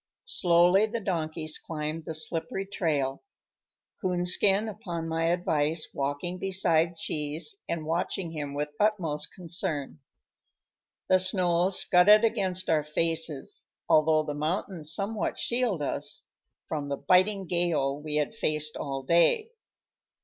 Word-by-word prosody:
Slowly 180 +3 +4
the 230 +2 -3
donkeys 160 -5 -2
climbed 155 0 -5
the 160 - -5
slippery 165 +4 -3
trail, 150 -9 -1 0.8
Coonskin, 185 +3 +3
upon 180 -6 -5
my 165 0 -1
advice, 160 -2 0
walking 145 +6 -3
beside 175 -3 +2
Cheese 155 - -2
and 160 -2 -3
watching 170 +1 -2
him 145 -3 -5
with 150 +1 -2
utmost 170 -9 0
concern. 165 -5 -4 1.1
The 185 - +4
snow 180 -1 +3
scudded 195 +3 +5
against 185 -4 0
our 155 -2 +2
faces, 160 -1 -2 0.2
although 155 0 +4
the 150 - -4
mountain 160 +3 -3
somewhat 200 +7 -2
shielded 235 - 0
us - - -4 0.4
from 145 -2 -4
the 140 - -2
biting 190 +2 +2
gale 170 -6 +1
we 150 0 -3
had 150 +4 0
faced 155 -8 -1
all 135 -1 -4
day. 170 - +3
170 Hz, 120 wpm, -28 LUFS, 155-185 Hz, 1.1 s, scudded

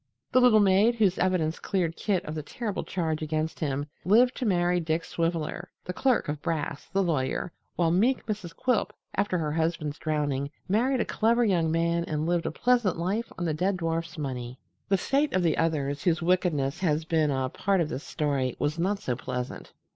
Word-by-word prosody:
The 255 - +5
little 245 -3 +6
maid 205 +4 +4
whose 205 -5 +2
evidence 170 -4 +1
cleared 175 -5 -1
Kit 190 -4 -1
of 155 - -5
the 155 - -3
terrible 210 +7 -4
charge 160 -4 -2
against 155 +1 -2
him 145 -2 -1 0.2
lived 240 +7 +4
to 250 - -1
marry 175 -2 +2
Dick 165 0 -1
Swiveller, 170 +2 -2 0.2
the 180 - -4
clerk 260 +4 +1
of 150 0 -3
Brass, 150 -3 -3
the 195 0 +2
lawyer, 155 0 -1 0.2
while 170 -2 +2
meek 230 +10 +2
Mrs. 205 -6 -4
Quilp, 250 -4 0 0.2
after 200 -2 0
her 155 -3 -1
husband's 160 -2 -1
drowning, 145 -3 -1 0.2
married 245 +6 +2
a - - 0
clever 235 +2 +2
young 170 -6 +2
man 170 +1 +1
and 155 -1 -2
lived 170 0 0
a - - -1
pleasant 240 0 +2
life 195 +7 -2
on 175 - -2
the 160 - 0
dead 185 +5 0
dwarf's 165 0 -2
money. 125 -4 -4 0.3
The 195 - +4
fate 280 +9 +1
of 185 - +2
the 165 -3 +2
others, 145 -3 0
whose 170 -4 +2
wickedness 170 -4 +1
has 155 -3 +1
been 160 -2 +2
a 130 -2 0
part 195 +7 0
of 165 -3 0
this 140 - -4
story, 140 -5 -1
was 150 +3 -1
not 195 +4 +1
so 130 -12 -2
pleasant. 125 +1 -5
170 Hz, 195 wpm, -27 LUFS, 155-195 Hz, 0.3 s, little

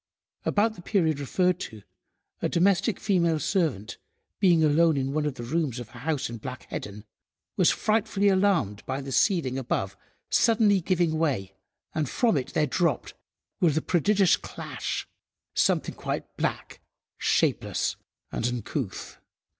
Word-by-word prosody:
About 215 +2 +2
the 180 - -12
period 165 -6 +1
referred 180 +5 +1
to 110 - -8 0.6
a - - 0
domestic 195 +4 +2
female 170 -6 +2
servant 145 - -1 0.4
being 175 -5 +4
alone 155 +1 +4
in 135 0 -1
one 150 0 0
of 145 - -3
the 120 - -7
rooms 140 -1 -1
of 120 -3 -8
a 125 - -12
house 145 +1 -1
in 115 - -6
Black 130 +3 -7
Heddon, 105 0 -6 0.5
was - - +4
frightfully 215 -2 +1
alarmed 185 - +2
by 130 +1 -2
the 135 -1 -6
ceiling 135 - +2
above 100 -6 -2 0.4
suddenly 215 -4 +4
giving 170 -2 +1
way, 120 -12 -1 0.4
and 155 -4 -1
from 230 -7 +2
it 130 -3 -2
there 150 - +3
dropped, 150 0 0 0.5
with 160 -4 +3
a - - +2
prodigious 190 +2 +3
clash, - - -5 0.5
something - - +1
quite - - -5
black, - - -3 0.4
shapeless, - - +1 0.4
and 115 - -1
uncouth. 120 -2 -4
160 Hz, 145 wpm, -27 LUFS, 130-185 Hz, 0.6 s, being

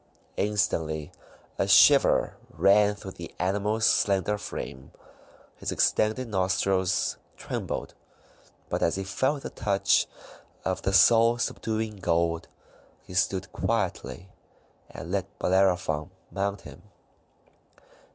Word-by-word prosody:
Instantly 80 -7 -1 0.5
a - - +1
shiver - - +5
ran 105 +1 +3
through 95 -1 -9
the 85 -2 -10
animal's 105 +4 0
slender 100 0 +2
frame, 70 -9 -7 0.7
his - - -5
distended 110 +4 +1
nostrils 95 -1 0 0.2
trembled; - - -5 0.7
but - - -2
as 85 - +1
he 95 - -3
felt 130 +9 -1
the - - -6
touch 100 -3 +1 0.6
of 95 - -1
the 95 - -1
soul 115 +3 +5
subduing 110 -2 -3
gold, 85 -2 0 0.6
he - - -12
stood 95 +1 -1
quietly 95 -3 -2 0.6
and 85 - -8
let 100 +1 -3
Bellerophon 90 -4 +1 0.2
mount 100 0 -2
him. 75 -3 -12
95 Hz, 105 wpm, -27 LUFS, 90-105 Hz, 0.7 s, shiver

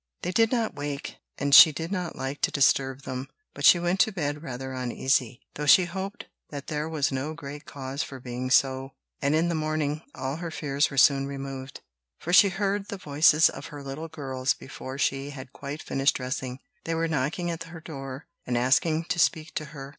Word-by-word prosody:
They 180 - -1
did 225 +3 +3
not 235 -3 0
wake, 145 -1 -5 0.2
and 140 0 -1
she 160 +2 +11
did 165 +4 -5
not 180 -4 -3
like 135 +2 -5
to - - +3
disturb 135 -1 +2
them; 130 0 -5 0.3
but - - -3
she - - +9
went 175 +2 0
to 220 - +4
bed 150 -6 -3
rather 130 -2 -6
uneasy, 125 -1 0
though 150 0 -4
she 180 +5 +7
hoped 190 +3 -6 0.2
that 140 -2 -7
there 150 +1 -3
was 150 -4 0
no 140 +4 -3
great 145 0 -8
cause 135 0 -5
for 135 - -6
being 125 +1 -5
so; 130 0 +2 0.3
and 140 +2 +2
in 165 +2 +2
the 170 - 0
morning 155 -1 -1
all 135 +3 -3
her 170 0 -5
fears 145 -2 0
were 140 - -8
soon 135 0 +5
removed, 135 -1 -7 0.4
for 175 - -4
she 200 +2 +8
heard 200 +1 -1
the 200 - -5
voices 155 0 +5
of 140 - -6
her 145 -1 -9
little 140 +4 -6
girls 135 -4 -2
before 135 0 -8
she 135 0 0
had 135 -2 -9
quite 145 +2 -7
finished 135 +2 +1
dressing. 130 -1 -4 0.3
They 165 - -1
were 165 0 0
knocking 160 +4 -1
at 165 - -5
her 165 0 -10
door, 135 -3 -8 0.2
and 125 -1 0
asking 155 +6 +2
to 175 +1 -2
speak 160 -2 +1
to 155 - -3
her. 135 -1 -9
145 Hz, 205 wpm, -27 LUFS, 135-165 Hz, 0.4 s, she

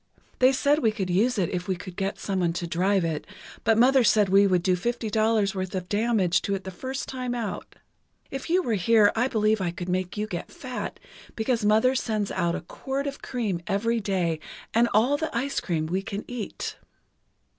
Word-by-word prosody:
They 255 +1 +6
said 285 +3 +2
we 225 -7 +2
could 195 -4 -3
use 220 +7 +2
it 180 -4 +1
if 180 0 -3
we 190 - 0
could 180 0 -9
get 195 +2 -2
someone 185 -4 -1
to 175 - -3
drive 185 +2 +1
it, 160 -2 -3 0.4
but 225 -1 +3
Mother 260 +2 +5
said 210 -3 +4
we 200 +1 +6
would 180 -2 +2
do 185 0 +3
fifty 230 +3 -2
dollars 220 -2 +2
worth 190 0 -4
of 180 -1 -3
damage 205 -5 +2
to 200 - -1
it 190 - -6
the 190 - -6
first 260 +8 -5
time 250 -2 -3
out. 225 -5 -5 0.6
If 270 +2 -5
you 365 +2 +3
were 235 - 0
here 210 +2 +4
I 235 +3 +2
believe 215 -4 +1
I 180 - 0
could 175 +1 -6
make 185 +2 -2
you 210 - 0
get 175 -5 -6
fat, 255 -2 -6 0.4
because 230 0 0
Mother 220 +5 +4
sends 215 -5 -1
out 170 0 0
a - - -4
quart 270 +10 -4
of 280 0 -5
cream 210 -9 -2
every 230 +4 +1
day 180 -6 -1 0.3
and 235 +1 +4
all 245 +7 +3
the 320 +1 -2
ice 275 +4 -1
cream 160 -3 -1
we 180 +4 -1
can 200 +1 -5
eat! 245 -4 -5
210 Hz, 210 wpm, -26 LUFS, 185-240 Hz, 0.6 s, They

